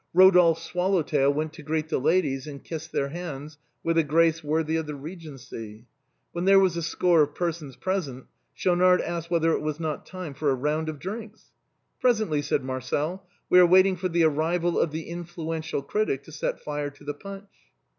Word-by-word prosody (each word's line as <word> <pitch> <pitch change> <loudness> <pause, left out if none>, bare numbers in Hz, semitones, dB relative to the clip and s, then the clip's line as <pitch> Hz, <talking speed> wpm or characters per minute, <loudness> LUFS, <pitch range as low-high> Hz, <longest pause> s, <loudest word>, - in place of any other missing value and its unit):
Eodolphe's 180 -3 +6
swallow 180 0 +1
tail 140 -1 +2
went 155 +2 -2
to 160 - -11
greet 155 +1 -2
the - - 0
ladies, 140 -3 +1
and 140 -2 -8
kissed 160 -1 -7
their 140 - -1
hands 150 -2 -7 0.2
with 165 0 +2
a - - +4
grace 160 +2 +2
worthy 155 +1 0
of 160 -1 -1
the 150 - -4
Eegency. 135 - -9 0.5
When 175 +1 -3
there 195 0 +7
were 195 - +5
a - - +3
score 170 0 +3
of 145 0 0
persons 165 -6 -3
present, 165 -10 -3 0.3
Schaunard 180 0 +4
asked 170 -1 -4
whether 165 -1 +2
it - - 0
was 155 0 -3
not 155 -3 -4
time 185 -6 -7
for 145 +2 -1
a 135 - +2
round 150 +4 -1
of 155 - -5
drinks. 215 +6 -8 0.2
" - - -49
Presently," 215 -12 +2
said 145 -1 -1
Marcel. 145 +8 -3
" - - -44
We 180 - +8
are 180 - +8
waiting 185 +2 +5
for 185 +1 -2
the 170 -1 +2
arrival 165 +3 +1
of - - +2
the 160 +2 -5
influential 165 -3 -4
critic 140 -5 -1
to - - -14
set 155 - -3
fire 145 -1 -3
to 145 +1 -18
the 145 0 -3
punch." 195 +5 -10
160 Hz, 200 wpm, -26 LUFS, 145-180 Hz, 0.5 s, We